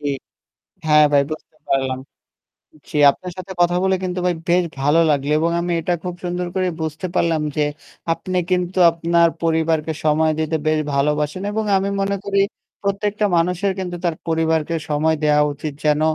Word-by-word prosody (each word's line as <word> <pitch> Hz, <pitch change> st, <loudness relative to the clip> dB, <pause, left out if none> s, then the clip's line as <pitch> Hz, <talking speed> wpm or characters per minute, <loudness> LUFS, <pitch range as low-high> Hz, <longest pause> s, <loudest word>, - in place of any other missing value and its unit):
ঠিক। 140 Hz, -2 st, -2 dB, 0.7 s
হ্যাঁ 150 Hz, 0 st, +6 dB
ভাই 140 Hz, -1 st, +5 dB
বুঝতে 155 Hz, 0 st, -8 dB
পারলাম। 135 Hz, -1 st, +1 dB, 0.9 s
জি, -, -, -3 dB
আপনার 180 Hz, +5 st, -9 dB
সাথে 185 Hz, +1 st, -7 dB
কথা 175 Hz, 0 st, +3 dB
বলে 190 Hz, 0 st, +3 dB
কিন্তু 180 Hz, 0 st, -2 dB
ভাই 180 Hz, -1 st, +1 dB
বেশ 180 Hz, +1 st, +4 dB, 0.2 s
ভালো 145 Hz, +4 st, +3 dB
লাগলো 145 Hz, 0 st, +1 dB
এবং 165 Hz, +1 st, +1 dB
আমি 175 Hz, 0 st, -2 dB
এটা 175 Hz, -, 0 dB
খুব 180 Hz, -, -3 dB
সুন্দর 180 Hz, 0 st, -2 dB
করে 185 Hz, -1 st, +1 dB
বুঝতে 160 Hz, +3 st, -4 dB
পারলাম 165 Hz, -2 st, +2 dB
যে 150 Hz, -, +1 dB, 0.5 s
আপনি 185 Hz, +2 st, -4 dB
কিন্তু 180 Hz, 0 st, 0 dB
আপনার 170 Hz, 0 st, +3 dB, 0.2 s
পরিবারকে 160 Hz, -1 st, +1 dB
সময় 155 Hz, +1 st, +3 dB
দিতে 160 Hz, 0 st, -1 dB
বেশ 155 Hz, 0 st, +2 dB
ভালোবাসেন 150 Hz, +4 st, 0 dB
এবং 220 Hz, +1 st, -1 dB
আমি 195 Hz, +1 st, -1 dB
মনে 195 Hz, 0 st, 0 dB
করি 200 Hz, 0 st, 0 dB, 0.4 s
প্রত্যেকটা 205 Hz, +1 st, 0 dB
মানুষের 180 Hz, +3 st, +1 dB
কিন্তু 180 Hz, -2 st, -4 dB
তার 170 Hz, -2 st, +1 dB
পরিবারকে 160 Hz, 0 st, +1 dB
সময় 155 Hz, +2 st, +2 dB
দেওয়া 150 Hz, 0 st, +4 dB
উচিত 145 Hz, +1 st, -5 dB
যেন 150 Hz, 0 st, +3 dB
165 Hz, 165 wpm, -20 LUFS, 150-180 Hz, 0.9 s, হ্যাঁ